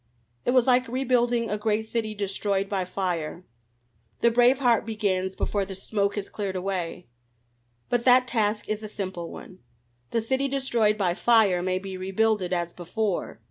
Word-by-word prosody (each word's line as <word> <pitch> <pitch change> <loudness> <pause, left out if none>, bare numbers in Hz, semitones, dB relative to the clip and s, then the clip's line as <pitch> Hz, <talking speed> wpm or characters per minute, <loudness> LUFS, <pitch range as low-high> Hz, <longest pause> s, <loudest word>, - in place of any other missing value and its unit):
It - - 0
was 250 -2 +5
like 255 0 +3
rebuilding 245 -2 +1
a 210 - -1
great 220 +1 0
city 220 -1 -2
destroyed 200 0 -1
by 195 -2 -1
fire; 180 -2 -3 0.8
the 235 - +5
brave 245 +3 +5
heart 245 -4 +3
begins 195 -4 -1
before 205 -1 -1
the 190 0 -6
smoke 200 +1 -1
has 205 -2 -3
cleared 200 -3 -4
away. 180 -2 -3 0.8
But 240 -1 0
that 250 0 +6
task 215 -3 0
is 215 0 -2
a 215 - -6
simple 185 -5 -5
one. 185 - -11 0.5
The 230 - 0
city 265 +4 0
destroyed 240 -6 +1
by 185 -4 +1
fire 205 -3 +4
may 185 0 0
be 190 0 -6
rebuilded 195 0 0
as 175 -1 -1
before. 190 +2 -3
210 Hz, 165 wpm, -26 LUFS, 190-235 Hz, 0.8 s, that